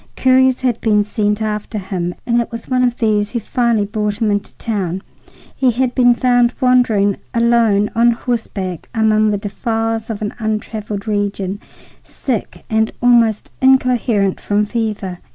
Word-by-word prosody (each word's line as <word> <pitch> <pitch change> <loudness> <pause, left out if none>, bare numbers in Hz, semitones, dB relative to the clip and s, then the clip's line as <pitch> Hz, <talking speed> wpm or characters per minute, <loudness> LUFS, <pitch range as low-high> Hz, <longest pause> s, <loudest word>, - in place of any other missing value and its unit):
Couriers 260 0 +3
had 245 -3 0
been 210 -2 +3
sent 210 0 -1
after 215 +1 -3
him, 185 -3 -3
and 235 0 +2
it 235 - -6
was 230 -1 -7
one 255 -1 +1
of 245 -1 +1
these 210 -2 +1
who 235 - -2
finally 235 -2 0
brought 210 0 -2
him 220 -3 +1
into 205 0 -2
town. 190 -5 -3 0.5
He 260 - +2
had 250 +1 0
been 245 -2 +4
found 245 -1 +2
wandering 240 -6 +3 0.2
alone 230 -3 +3
on 235 +1 +4
horseback 210 -7 -4
among 215 -1 +3
the 205 - 0
defiles 225 +2 -2
of 215 -1 -4
an 210 - -3
untraveled 215 -1 -4
region, 205 -2 -2 0.4
sick 245 -6 -5
and 220 0 +1
almost 235 -3 +3
incoherent 245 -7 +2
from 205 +1 +1
fever. 210 -5 -3
220 Hz, 155 wpm, -17 LUFS, 205-240 Hz, 0.5 s, been